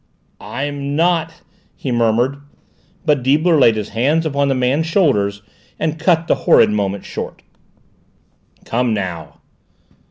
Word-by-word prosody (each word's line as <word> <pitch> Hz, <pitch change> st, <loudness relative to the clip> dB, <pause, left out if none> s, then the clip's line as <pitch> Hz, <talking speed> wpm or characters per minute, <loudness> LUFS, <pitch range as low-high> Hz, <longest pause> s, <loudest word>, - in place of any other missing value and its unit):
"I'm 140 Hz, +1 st, -4 dB
not 165 Hz, 0 st, 0 dB
" -, -, -38 dB
he 130 Hz, -, -5 dB
murmured. 120 Hz, +3 st, +1 dB, 0.7 s
But 150 Hz, -4 st, +2 dB
Deibler 155 Hz, +5 st, +3 dB
laid 115 Hz, -4 st, +5 dB
his 105 Hz, -1 st, -4 dB
hands 145 Hz, +9 st, +1 dB
upon 140 Hz, -2 st, 0 dB
the 135 Hz, -, +1 dB
man's 130 Hz, +6 st, 0 dB
shoulders 105 Hz, -, +1 dB, 0.3 s
and 160 Hz, 0 st, -2 dB
cut 165 Hz, 0 st, +2 dB
the -, -, +2 dB, 0.2 s
horrid -, -, +6 dB
moment 100 Hz, -2 st, -2 dB
short. -, -, -7 dB, 1.2 s
"Come 120 Hz, -1 st, 0 dB
now!" 90 Hz, -5 st, -6 dB
140 Hz, 130 wpm, -18 LUFS, 115-160 Hz, 1.2 s, horrid